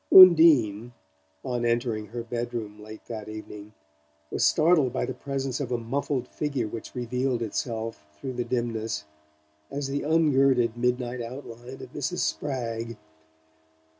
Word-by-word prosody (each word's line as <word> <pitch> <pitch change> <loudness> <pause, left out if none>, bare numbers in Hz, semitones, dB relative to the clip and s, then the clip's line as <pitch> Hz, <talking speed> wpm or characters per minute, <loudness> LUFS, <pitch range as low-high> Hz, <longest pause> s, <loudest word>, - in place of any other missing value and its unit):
Undine, 145 - +8 0.5
on 120 -1 -1
entering 115 -2 0
her 120 +2 -5
bedroom 115 -3 -4
late 110 +1 -11
that 110 -2 -6
evening, 105 -1 -9 0.6
was - - 0
startled 155 -5 +4
by - - -1
the 130 - -4
presence 135 0 -3
of 130 -4 -3
a 120 - +1
muffled 125 +2 -2
figure 140 -6 -2
which 115 +1 -8
revealed 125 0 -1
itself, 115 -4 -3
through 130 +12 -5
the 125 0 -1
dimness, 115 -9 -2 0.6
as 140 -1 -3
the 140 +1 -1
ungirded 135 -7 +3
midnight 125 0 -1
outline 120 +1 -8
of - - -11
Mrs. - - -2
Spragg. 115 - -2
120 Hz, 135 wpm, -27 LUFS, 115-135 Hz, 0.6 s, Undine